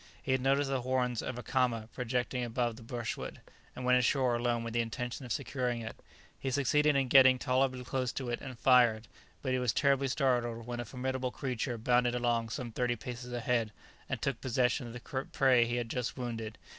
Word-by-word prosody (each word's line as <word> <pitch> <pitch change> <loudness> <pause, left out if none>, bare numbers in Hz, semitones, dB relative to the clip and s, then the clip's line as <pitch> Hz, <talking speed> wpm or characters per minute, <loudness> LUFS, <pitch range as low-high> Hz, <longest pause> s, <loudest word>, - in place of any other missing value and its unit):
He - - -3
had 130 -1 +2
noticed 135 +1 +2
the 135 -2 0
horns 125 -2 0
of 125 - -4
a 125 - -6
caama 120 -4 0
projecting 125 0 -1
above 120 0 -1
the 120 - -12
brushwood, 115 0 -5 0.4
and 125 - -5
went 125 0 +5
ashore 125 +1 +2
alone 120 0 0
with 115 -1 -5
the 120 - +2
intention 125 +3 -4
of - - -8
securing 125 -3 -1
it. 115 - -6 0.4
He 135 - -2
succeeded 145 +3 +3
in 135 -1 +2
getting 130 0 +7
tolerably 130 0 +1
close 130 -1 -1
to 130 -3 -3
it 120 - -3
and 130 -2 -7
fired, 115 -2 +4 0.4
but 130 - -1
he 130 - +1
was 125 -3 +1
terribly 140 -1 +2
startled 120 -4 0
when 120 0 -4
a 120 - -3
formidable 130 0 -2
creature 125 -1 -3
bounded 120 +2 +2
along 120 -2 0
some 120 +1 -4
thirty 120 +1 0
paces 125 +1 -7
ahead, 120 -2 0 0.4
and - - -2
took 135 -3 -2
possession 125 0 +1
of 115 - -8
the 130 +2 -5
prey 130 -3 +5
he 120 - -1
had 120 -1 -1
just 125 +2 -3
wounded. 115 -3 -4
125 Hz, 205 wpm, -32 LUFS, 120-130 Hz, 0.4 s, getting